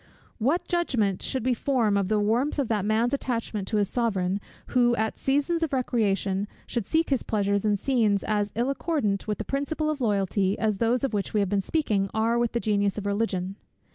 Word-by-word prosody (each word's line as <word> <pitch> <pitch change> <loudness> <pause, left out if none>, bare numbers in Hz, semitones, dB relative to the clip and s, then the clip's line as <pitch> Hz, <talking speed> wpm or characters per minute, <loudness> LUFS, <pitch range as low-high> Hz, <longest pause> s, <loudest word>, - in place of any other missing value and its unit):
What 280 +10 +1
judgment 245 - 0
should 260 -4 -1
we 255 - +3
form 235 -4 +1
of 200 -2 +1
the 215 +1 +2
warmth 235 +9 +1
of 275 -5 0
that 210 -3 0
man's 225 +4 +1
attachment 230 -7 -2
to 215 - 0
his 205 -1 +2
Sovereign, 200 -5 0 0.3
who, 240 -1 +3
at 220 -1 -2
seasons 290 +5 +1
of 320 -3 -1
recreation, 205 -6 0 0.2
should 235 -5 -3
seek 320 -1 +1
his 270 - +2
pleasures 200 -1 0
in 210 -1 +3
scenes 215 -4 +1
as 205 -1 0
ill 240 +4 +1
accordant 275 - -1
with 210 - -1
the - - -5
principle 305 +3 -1
of 290 -3 -5
loyalty, 200 -3 +1
as 215 -3 0
those 240 +3 +1
of 270 - 0
which 205 +1 -2
we - - +4
have 200 -2 +1
been 200 0 +1
speaking 200 - 0
are 230 +2 +2
with 240 -1 0
the 235 - +1
genius 205 -3 +1
of 205 - -4
religion? 200 -2 -1
220 Hz, 205 wpm, -26 LUFS, 200-255 Hz, 0.3 s, we